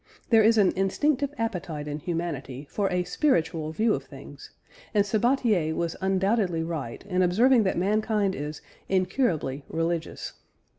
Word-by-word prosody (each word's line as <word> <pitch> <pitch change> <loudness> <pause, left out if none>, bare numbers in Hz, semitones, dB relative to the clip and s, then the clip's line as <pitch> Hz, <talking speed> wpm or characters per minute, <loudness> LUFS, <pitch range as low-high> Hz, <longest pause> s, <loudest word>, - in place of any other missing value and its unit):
There 225 -1 +7
is 225 +1 +4
an 200 -3 +5
instinctive 275 +9 +1
appetite 180 - -3
in 150 0 -4
humanity 150 -5 -4
for 200 -2 0
a 180 0 +1
spiritual 170 - 0
view 215 +7 +2
of - - -3
things, - - -12 0.5
and 205 -1 +4
Sabatier 215 - +1
was 170 -1 -2
undoubtedly 190 -2 +1
right 160 -7 -5
in 185 -2 0
observing 230 +8 +4
that 190 - 0
mankind 210 +1 +1
is 150 0 -5 0.3
"incurably 180 - 0
religious." 165 0 -3
185 Hz, 140 wpm, -26 LUFS, 165-215 Hz, 0.5 s, There